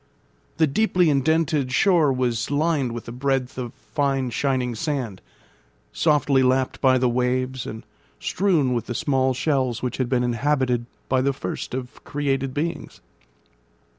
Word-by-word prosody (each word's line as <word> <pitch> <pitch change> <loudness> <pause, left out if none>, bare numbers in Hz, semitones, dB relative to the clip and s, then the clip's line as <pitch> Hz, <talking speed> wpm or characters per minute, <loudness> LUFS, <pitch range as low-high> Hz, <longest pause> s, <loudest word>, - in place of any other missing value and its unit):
The 160 - +5
deeply 180 +1 +2
indented 150 -1 +1
shore 160 - +4
was 120 -3 -1
lined 145 -3 +1
with 115 -1 -7
a - - -5
breadth 130 0 -1
of 120 -2 -4
fine 135 -4 -1
shining 125 0 0
sand, 125 - -3 0.7
softly 135 - +3
lapped 130 0 +1
by 130 -1 +5
the 125 0 +2
waves, 125 +1 -1
and 110 0 -7 0.3
strewn 165 -9 +1
with 120 - -2
the 120 - -4
small 130 0 +1
shells 130 -3 0
which 125 - -2
had 130 -2 -1
been 125 -1 +2
inhabited 125 0 0 0.2
by 130 0 +2
the 140 +1 +1
first 130 - -5
of 130 +1 -7
created 135 -2 -1
beings. 155 +3 -4
130 Hz, 145 wpm, -23 LUFS, 125-145 Hz, 0.7 s, The